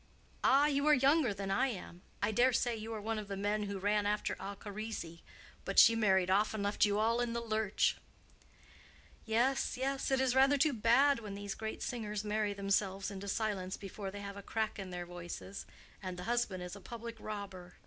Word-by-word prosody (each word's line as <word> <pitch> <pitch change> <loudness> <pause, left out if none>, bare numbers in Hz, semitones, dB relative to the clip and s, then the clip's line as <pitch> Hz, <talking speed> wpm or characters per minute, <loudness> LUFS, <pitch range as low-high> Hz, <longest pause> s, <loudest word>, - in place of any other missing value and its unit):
"Ah, 275 +2 +5
you 285 0 +1
are 300 - +7
younger 275 -1 +4
than 195 -1 -4
I 200 +7 +3
am. 180 -6 -7 0.2
I - - +2
dare 245 +4 +4
say 240 -1 +1
you 220 +1 -6
are 220 - -3
one 220 +1 -2
of 210 - -7
the 195 -1 -4
men 205 +1 0
who 200 -1 -4
ran 205 +1 +1
after 210 0 0
Alcharisi. 200 -3 -6 0.4
But - - -4
she 230 - +9
married 190 -4 +3
off 210 +3 +2
and 205 - -2
left 205 +1 +3
you 205 0 +1
all 230 +3 +2
in 240 -1 -1
the 235 - -1
lurch." 220 -3 +1 1.3
"Yes, 245 +4 +1
yes; 270 +2 -1
it's 265 -2 +2
rather 270 +2 +5
too 290 +1 +3
bad 240 +5 +4
when 210 -3 -7
these 200 0 -4
great 220 0 -5
singers 210 -4 -3
marry 210 0 0
themselves 195 0 0
into 200 0 -7
silence 200 -3 -2
before 195 0 -6
they 200 +1 -7
have 200 0 -7
a - - -6
crack 220 +1 -2
in 190 -1 -5
their 175 -1 -5
voices. 175 +2 -7 0.3
And 185 -2 -5
the 180 - -6
husband 225 -6 -1
is 180 +2 -6
a 200 - -11
public 235 +2 -7
robber. 195 -4 -7
210 Hz, 200 wpm, -34 LUFS, 195-235 Hz, 1.3 s, she